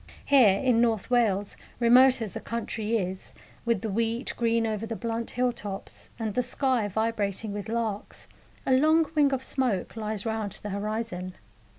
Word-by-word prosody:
Here, 240 -9 +6
in 250 -3 +3
North 230 -1 0
Wales, 205 -5 +2 0.2
remote 250 +1 +6
as 210 - -6
the - - -4
country 230 -1 -2
is, 185 -2 -5 0.3
with 230 -5 +1
the 220 - -3
wheat 230 +4 -1
green 230 -1 +1
over 220 0 -2
the 225 - -4
blunt 230 0 -3
hill 250 0 +1
tops, 205 -4 -8
and 220 -3 -3
the 250 - +2
sky 250 -2 0
vibrating 215 0 -1
with 205 +1 -5
larks, 225 -3 -3 0.4
a 260 - +3
long 315 +5 +4
wing 290 -3 +4
of 265 -1 -1
smoke 240 -11 0
lies 215 -1 -3
round 220 -3 -2
the 210 - -5
horizon. 200 -3 -3
225 Hz, 170 wpm, -27 LUFS, 210-240 Hz, 0.4 s, Here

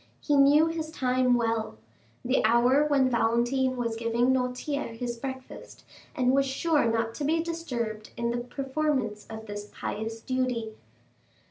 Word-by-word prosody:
He 295 - +1
knew 285 +3 +6
his 325 -1 -3
time 255 -4 +2
well—the 230 +2 -2
hour 245 +6 +4
when 275 -3 +3
Valentine 240 +3 +1
was 230 -2 -1
giving 230 +3 +1
Noirtier 250 0 -2
his 240 0 -3
breakfast, 260 +2 -8 0.3
and 250 0 +2
was 275 +1 +3
sure 295 +1 +1
not 225 0 0
to 295 - -5
be 320 +3 +2
disturbed 240 -11 -4
in 235 0 -1
the 240 - -1
performance 265 -4 -2
of 220 0 -7
this 205 0 -7
pious 225 +2 -5
duty. 250 -3 -2
250 Hz, 140 wpm, -27 LUFS, 230-275 Hz, 0.3 s, knew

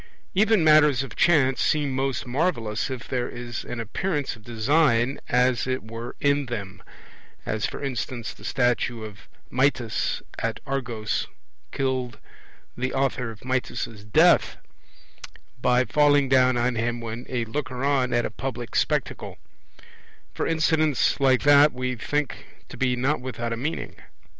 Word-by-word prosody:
Even 215 -1 +3
matters 150 -4 +5
of 125 -5 -9
chance 140 -6 +3
seem 145 -3 +1
most 135 0 -1
marvellous 120 - -1
if 130 -2 -6
there 125 -2 -2
is 120 0 -6
an 120 - -6
appearance 145 - -2
of 110 - -18
design 120 +2 +2
as 125 0 +2
it 130 0 -2
were 115 +2 -7
in 140 -1 +1
them; 105 -4 -6 0.6
as 110 0 -1
for - - -7
instance 125 -3 -4
the - - -17
statue 120 -2 0
of 105 -2 -11 0.2
Mitys 130 -3 0 0.2
at - - -2
Argos 120 -5 -2 0.4
killed 130 -4 -2 0.6
the 130 +1 -2
author 130 -3 0
of 110 -2 -10
Mitys' 125 -4 -3
death - - +4 1.0
by 125 +1 +3
falling 145 -1 +4
down 130 -1 +4
on 120 +1 +1
him 120 +1 -1
when 115 +1 -6
a 120 -3 -1
looker 130 +1 -4
on 135 -3 +2
at 120 0 +1
a - - -4
public 120 0 -5
spectacle; - - -1 1.0
for - - -2
incidents 155 -3 +2
like 130 -2 +3
that 145 +1 +6
we 125 0 -2
think 145 +4 -3 0.2
to - - -9
be 125 -1 +1
not 130 +4 0
without 120 -2 -4
a - - -2
meaning. 145 +8 -4
130 Hz, 145 wpm, -25 LUFS, 120-140 Hz, 1.0 s, that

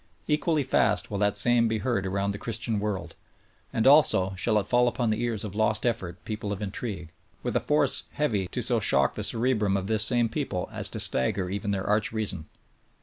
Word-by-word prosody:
Equally 150 0 +1
fast - - +1
Vv - - -16
ill - - -1
that 105 0 +2
same 115 +2 +4
be 110 0 -1
heard 110 -4 -1
around 100 +1 -1
the 100 - -6
Christian 115 -1 -3
world; 95 -5 -4 0.6
and, 115 - -1
also, 130 -10 +5
shall 105 +3 +1
it 100 - 0
fall 120 +2 +3
upon 120 -1 0
the 110 +2 -2
ears 115 -4 -1
of 105 -3 -6
lost 110 +1 0
effort 95 -8 -2
people 105 -2 -5
of 100 - -4
intrigue, 100 -4 -5 0.3
with - - -3
a - - +4
force 150 -2 +2
heavy 110 -11 -1
to 125 +6 -1
so 120 0 +3
shock 70 -10 +3
the - - -5
cerebrum 110 -5 +1
of 95 - -4
this 110 0 0
same 120 +1 +1
people 115 -7 -3
as - - +2
to - - -6
stagger 90 +7 0
even 100 +1 -3
their 95 -1 -2
arch 105 0 +1
reason! 110 -8 -2
110 Hz, 210 wpm, -26 LUFS, 100-120 Hz, 0.6 s, also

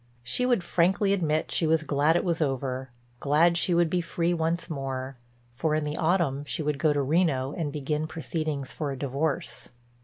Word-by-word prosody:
She 125 - +1
would 240 -8 +2
frankly 190 +4 +2
admit 155 -5 0
she 165 - +1
was 160 0 +3
glad 150 +2 +2
it - - +2
was 170 -2 -1
over, 135 -2 -2 0.3
glad 160 +4 +3
she 175 +1 +1
would 170 0 +4
be 175 +2 0
free 170 +1 -1
once 165 +1 0
more, 135 -3 -4 0.4
for 155 +6 0
in 155 - 0
the 150 0 -3
autumn 160 -5 +1
she 155 +2 -3
would 150 -1 -1
go 155 - +3
to 145 -1 +1
Reno 140 -3 +1
and 160 -5 -3
begin 150 +2 -2
proceedings 155 -4 -3
for 150 -3 -3
a 135 - -5
divorce. 140 +3 -2
155 Hz, 190 wpm, -27 LUFS, 140-170 Hz, 0.4 s, would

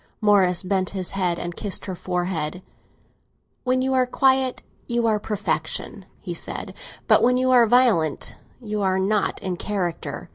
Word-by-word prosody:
Morris 195 -5 +3
bent 185 -1 0
his 185 -2 -2
head 180 -3 0
and 175 0 -5
kissed 205 -3 -4
her 190 - -4
forehead. 180 -2 -3 1.0
"When 255 0 +1
you 265 0 0
are 255 -1 +3
quiet, 260 0 +2 0.2
you 235 -1 0
are 215 -2 +2
perfection," 210 0 -3
he - - -6
said; - - -5 0.3
"but - - +5
when 250 +1 +4
you 255 0 +2
are 240 -2 +6
violent, 215 - +2 0.3
you 215 -4 -4
are 190 -1 +1
not 200 +2 0
in 185 -2 -2
character." 185 -4 -3
205 Hz, 155 wpm, -23 LUFS, 180-245 Hz, 1.0 s, are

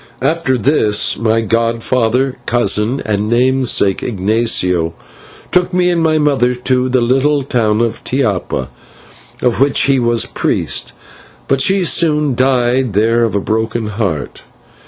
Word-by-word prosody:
After 160 -5 0
this, 110 -4 +1
my 115 +1 0
godfather, 115 +3 0
cousin, 120 +2 0
and 105 0 -1
namesake, 125 -5 +1
Ignatio, 95 -6 0 0.6
took 180 0 +1
me 180 0 +2
and 170 -1 0
my 160 -1 +2
mother 135 -5 +1
to 125 +1 -1
the 130 -1 +1
little 135 +4 +1
town 115 -4 0
of 115 -1 -2
Tiapa, 105 - -2 0.7
of 125 0 +1
which 140 +1 +3
he 135 -1 +2
was 120 -1 0
priest, - - -2 0.5
but 135 -1 +1
she 190 +6 +3
soon 150 -5 +1
died 125 -1 +1
there 115 +3 +2
of 115 -3 -1
a - - +2
broken 110 +1 -2
heart. 100 -9 -4
120 Hz, 135 wpm, -14 LUFS, 110-135 Hz, 0.7 s, which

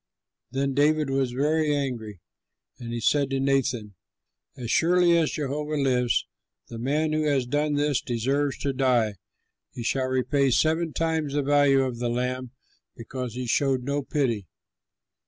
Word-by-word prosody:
Then 135 +2 -1
David 150 +1 +2
was 135 -1 +1
very 150 +4 +1
angry, 115 -9 -4 0.6
and 115 -1 -7
he 120 - -3
said 140 +4 +2
to 135 -1 -1
Nathan, 135 -6 0 0.6
"As 120 -3 -4
surely 175 +1 +4
as 165 -2 +2
Jehovah 150 +1 -3
lives, 125 -3 +1 0.4
the 115 - -7
man 150 +5 0
who 155 - +1
has 140 -4 +1
done 145 +3 0
this 145 -2 +1
deserves 135 +4 -1
to 140 -1 0
die; 125 -6 +1 0.6
he 120 - -5
shall 130 +2 0
repay 130 +2 +1
seven 160 +5 +2
times 160 -3 -1
the 145 - +1
value 140 -1 +4
of 125 -3 -3
the 120 0 -1
lamb, 125 +1 -2 0.5
because 125 0 -6
he 125 0 -3
showed 130 +1 +1
no 140 +2 -1
pity." 125 - -1
135 Hz, 155 wpm, -25 LUFS, 125-145 Hz, 0.6 s, surely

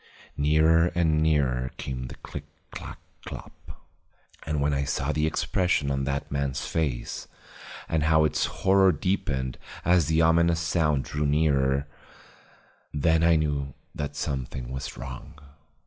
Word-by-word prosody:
Nearer 80 +3 +4
and 80 -3 +2
nearer 65 -5 +1
came 65 -2 -5
the - - -9
click - - -8 0.3
clack - - -8 0.3
clop. - - -11 0.6
And 75 -1 0
when 70 +1 +1
I 70 0 0
saw 70 +1 -1
the 75 +1 +1
expression 80 -3 +1
of 70 0 -1
that 70 0 -3
man's 70 -2 -1
face 65 -7 -2 0.6
and 80 - 0
how 80 0 +5
its 75 - +1
horror 95 0 +4
deepened 70 -7 -1 0.3
as 85 -3 +4
the 80 +1 +3
ominous 85 0 +4
sound 80 -5 +1
drew 75 0 -2
nearer, 70 -2 +2 1.1
then 80 +2 +2
I 85 0 +5
knew 70 -3 -1 0.2
that 75 0 -4
something 65 -4 -4
was 65 0 -5
wrong. 65 +2 -8
75 Hz, 135 wpm, -26 LUFS, 70-80 Hz, 1.1 s, how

